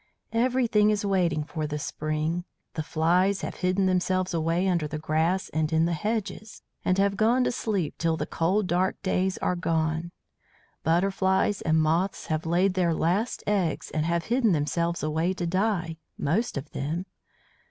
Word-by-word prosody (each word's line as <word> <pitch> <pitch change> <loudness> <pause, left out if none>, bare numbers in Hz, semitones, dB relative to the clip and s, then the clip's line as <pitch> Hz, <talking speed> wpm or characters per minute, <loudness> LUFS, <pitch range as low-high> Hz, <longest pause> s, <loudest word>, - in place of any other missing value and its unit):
"Everything 235 -3 +3
is 210 -1 0
waiting 175 -6 +1
for 155 0 -4
the 150 0 -3
spring. 155 +3 -2 0.3
The 155 - -2
flies 175 +5 +2
have - - -5
hidden 185 +1 +1
themselves 185 0 +1
away 165 +3 +1
under 170 -5 +1
the 155 +1 -4
grass 160 +4 0
and 155 0 -1
in 160 +1 +3
the 170 - 0
hedges, 215 +4 -3 0.2
and 185 - +2
have 200 0 +2
gone 235 +5 +3
to - - +1
sleep 200 -10 -2
till 165 -1 +1
the - - -2
cold 185 +5 0
dark 180 +2 0
days 190 0 0
are 180 - +1
done. 165 -1 -1 0.7
Butterflies 190 +4 +1
and 160 -1 +2
moths 165 +5 +1
have 155 +1 -2
laid 180 +3 +2
their 175 -3 +1
last 195 +10 0
eggs 195 -6 0
and 155 - 0
have 170 0 0
hidden 235 -4 +2
themselves 170 +2 -1
away, 160 +4 0
to 175 - -3
die, 180 -2 0 0.2
most 180 +7 0
of 140 +2 -6
them. 160 +6 -3
175 Hz, 165 wpm, -26 LUFS, 160-195 Hz, 0.7 s, Everything